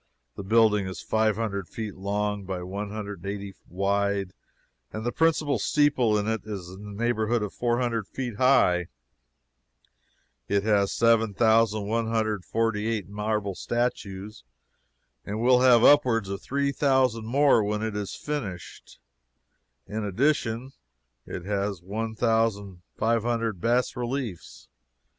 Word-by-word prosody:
The - - -6
building 105 -1 +3
is 95 -3 -6
five 110 -1 +1
hundred 100 -4 -3
feet 110 -3 -6
long 100 +1 -2
by 95 -1 -5
one 100 +3 -5
hundred 105 -2 -6
and 85 - -9
eighty 100 -1 -6 0.2
wide, 100 +1 0 0.6
and 110 +1 -5
the 120 - 0
principal 155 -5 +1
steeple 130 -5 +2
is 105 -3 -3
in 95 +3 -10
the 105 - -8
neighborhood 115 -1 +1
of 100 -4 -5
four 120 +3 0
hundred 115 -5 -1
feet 125 -5 -5
high. 105 -10 +4 1.6
It 100 0 +1
has 100 -2 +2
7,148 110 -1 +1
marble 105 -1 -2
statues, 105 - -3 0.8
and 105 +2 -4
will 125 +1 +4
have 125 -3 +6
upwards 120 -8 +5
of 100 0 -4
three 140 +1 -1
thousand 130 -5 +1
more 135 -2 +4
when 105 +1 -2
it 110 -2 -3
is 105 -2 -4
finished. 105 - -6 0.9
In 110 +1 -4
addition 120 +3 0 0.5
it 90 - -6
has 100 -1 -2
one 110 +4 -4
thousand 110 -5 0 0.2
five 115 +1 +2
hundred 115 -5 -2
bas 120 +4 +1
reliefs. 120 -6 -5
110 Hz, 125 wpm, -26 LUFS, 100-120 Hz, 1.6 s, have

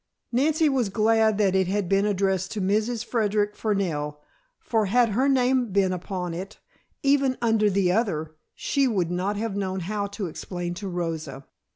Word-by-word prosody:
Nancy 305 +6 +2
was 260 -7 +1
glad 220 +1 +3
that 200 -3 +2
it 190 -1 +2
had 200 0 -1
been 195 +2 +2
addressed 190 -2 0
to 215 - -3
Mrs. 215 +4 0
Frederic 210 -3 0
Fernell, 165 -9 -1 0.4
for 220 -3 0
had 240 +3 +3
her 255 +7 +2
name 255 -3 +2
been 190 -1 +2
upon 180 -1 -4
it, 190 +5 -7 0.5
even 275 -2 +3
under 225 -3 +2
the 190 -2 +2
other, 160 -7 -1 0.2
she 275 -2 +1
would 185 -8 0
not 190 +3 -1
have 220 -1 -3
known 190 -1 -2
how 200 +3 -2
to 200 0 -5
explain 175 +1 -5
to 195 +3 -6
Rosa. 160 -6 -4
200 Hz, 170 wpm, -25 LUFS, 185-225 Hz, 0.5 s, glad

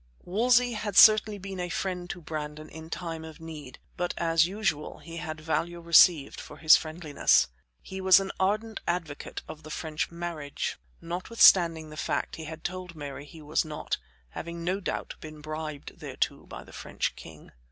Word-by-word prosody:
Wolsey 240 +5 +3
had 210 -2 -3
certainly 215 -1 +8
been 195 -1 -7
a 180 0 -2
friend 180 0 -3
to 175 - -6
Brandon 155 -1 -6
in 160 0 -10
time 165 -2 -5
of 160 -1 -10
need, 155 -5 -9 0.2
but, 175 0 -2
as 165 -1 +3
usual, 190 -6 -2
he 165 0 -10
had 155 -2 -5
value 165 +2 -2
received 170 -2 +5
for 150 - -11
his 155 +1 +8
friendliness. 155 - +2 0.3
He 190 0 -7
was 190 0 +7
an 195 0 -3
ardent 215 +3 0
advocate 165 -4 -3
of 155 0 -9
the 155 - -11
French 155 0 -3
marriage, 170 -4 -4 0.2
notwithstanding 170 -3 +4
the 155 - -10
fact - - -2
he 160 - -7
had 160 +1 -8
told 180 -1 -5
Mary 145 -1 -7
he 155 +1 -13
was 150 +1 +1
not; 155 -2 -4 0.3
having 170 - -6
no 185 +3 0
doubt 195 - -4
been 155 -1 -10
bribed 155 -1 -6
thereto - - -3
by - - -9
the - - -16
French - - -3
king. 80 -2 -13
165 Hz, 175 wpm, -28 LUFS, 155-185 Hz, 0.3 s, certainly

